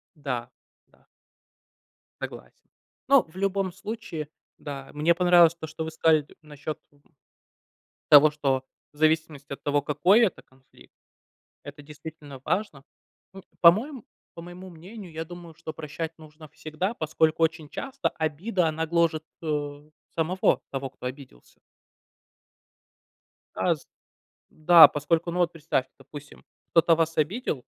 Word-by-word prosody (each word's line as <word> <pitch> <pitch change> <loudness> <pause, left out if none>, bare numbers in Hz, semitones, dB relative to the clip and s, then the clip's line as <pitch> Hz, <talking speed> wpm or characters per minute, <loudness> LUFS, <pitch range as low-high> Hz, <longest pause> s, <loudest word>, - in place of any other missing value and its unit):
Да, 125 -5 -4 0.4
да. - - -30 1.1
Согласен. - - -9 0.4
Но, 275 -2 +6
в 160 +2 -23
любом 195 0 -1
случае, 195 -6 -6 0.3
да, 135 -2 -8
мне 155 +3 +2
понравилось 175 -2 +5
то, 165 -2 -8
что 160 +1 -6
вы 160 - -5
сказали 160 -1 +3
т - - -20
насчёт, 150 -1 -7
м, 145 0 -29 1.1
того, 150 +1 +9
что 135 -3 -1 0.3
в - - -25
зависимости 155 -2 0
от 140 - -8
того, 145 0 +1
какой 165 - +3
это 220 -7 +1
конфликт, 130 0 -22 0.7
это 145 +1 -10
действительно 150 -2 -11
важно. 155 -10 -2 0.5
Ну, 195 0 -11 0.2
по-моем 225 - +4 0.3
по 170 - -9
моему 180 +2 -10
мнению, 180 +3 -11
я 160 +1 -4
думаю, 175 -1 -11
что 160 0 -8
прощать 160 +1 -6
нужно 155 0 -14
всегда, 155 +8 -4
поскольку 160 -2 0
очень 160 -1 0
часто 270 - -3
обида, 165 +4 -1
она 160 +1 -2
гложет, 165 -1 +1 0.2
э, 150 -1 -4 0.2
самого 175 +3 +1
того, 135 0 -4
кто 125 - -10
обиделся. 125 - -10 2.0
А, - - +1
з - - -19 0.6
да, 165 +1 +8
поскольку, 160 +3 -1
ну, 175 - -3
вот 175 -1 +2
представьте, 150 -5 -2
допустим, 145 -1 -12 0.3
кто-то 165 0 +5
вас 165 0 -1
обидел, 155 - -1
160 Hz, 135 wpm, -26 LUFS, 150-175 Hz, 2.0 s, того